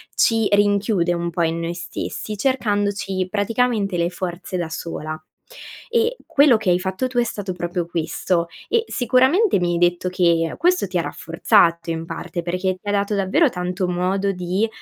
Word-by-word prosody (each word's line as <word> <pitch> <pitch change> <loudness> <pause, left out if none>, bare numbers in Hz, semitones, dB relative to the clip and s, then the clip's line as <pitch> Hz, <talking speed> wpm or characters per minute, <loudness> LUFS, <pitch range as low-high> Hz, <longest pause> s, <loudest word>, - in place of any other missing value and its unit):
ci 225 -2 +3
rinchiude 205 -3 +2
un 170 0 -2
po' 170 0 -1
in 165 0 0
noi 170 +1 -3
stessi, 180 +4 -5
cercandoci 205 -5 0
praticamente, 215 -1 0
le 170 0 +1
forze 180 0 -5
da 170 -2 -3
sola; 155 -1 -5 0.7
e, 470 +1 +1
quello 280 -4 +5
che 215 -3 -1
hai 175 - +3
fatto 190 +7 -2
tu 250 -1 -1
è 240 - +4
stato 205 -4 -4
proprio 175 0 -3
questo. 170 +1 -1 0.2
E, 460 -1 +2
sicuramente 260 - +3
mi 175 -1 0
hai - - 0
detto 175 +1 +1
che, 170 -2 +1
questo 360 - +2
ti 180 - -2
ha - - +2
rafforzato 170 0 +2
in 165 0 -4
parte, 170 +1 -5
perché, 180 +2 -1
ti 205 - -15
ha - - +2
dato 205 +1 0
davvero 200 - +3
tanto 180 0 -2
modo 185 +3 0
di 180 +4 -1
185 Hz, 175 wpm, -21 LUFS, 175-210 Hz, 0.7 s, quello